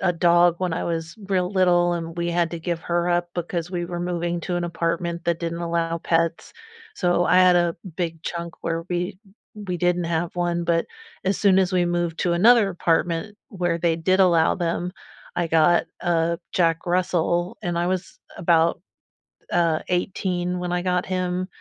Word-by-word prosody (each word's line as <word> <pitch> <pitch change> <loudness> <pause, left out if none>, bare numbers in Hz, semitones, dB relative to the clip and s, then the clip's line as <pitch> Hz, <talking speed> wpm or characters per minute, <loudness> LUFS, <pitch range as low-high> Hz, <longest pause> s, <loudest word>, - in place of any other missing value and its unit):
a 190 - +1
a - - 0
dog 175 0 +4
when 180 -3 -1
I 170 - -2
was 165 +1 -3
real 185 -2 +1
little, 175 -2 +3
and 165 -1 -5
we 170 0 -1
had 170 -1 0
to 170 - -5
give 170 0 -2
her 175 0 0
up 175 0 +1
because 175 -1 -3
we 175 -1 -3
were 175 0 -5
moving 175 -1 -2
to 180 - -3
an 175 - -1
apartment 170 0 -2
that 170 -1 0
didn't 170 0 -3
allow 170 -1 -1
pets. 165 0 -1 0.4
So 175 -1 +1
I 180 - +3
had 185 -1 +6
a 175 -1 +2 0.2
big 165 -2 -3
chunk 170 -1 -5
where 165 0 -2
we 180 +1 -2 0.4
we 200 -4 -4
didn't 175 0 +1
have 170 +1 -2
one, 175 -1 0
but 170 0 +1 0.4
as 195 +1 +1
soon 195 -2 +4
as 190 0 +2
we 180 -1 +3
moved 175 -1 -1
to 175 - +1
another 215 +4 +5
apartment 170 +3 0
where 175 -4 -1
they 170 -1 +1
did 185 +4 +2
allow 170 -4 +4
them, 175 0 -2 0.4
I 175 -1 -1
got 165 +1 +4
a 170 -1 +1
Jack 165 -2 +1
Russell 175 0 0
and 175 -1 -3
I 175 +1 0
was 185 -1 -4 0.2
about, 165 -1 +2 0.7
uh, 165 -2 +2
18 180 0 -1
when 180 0 -3
I 180 - 0
got 180 0 0
him, 185 0 -2
175 Hz, 185 wpm, -23 LUFS, 170-180 Hz, 0.7 s, had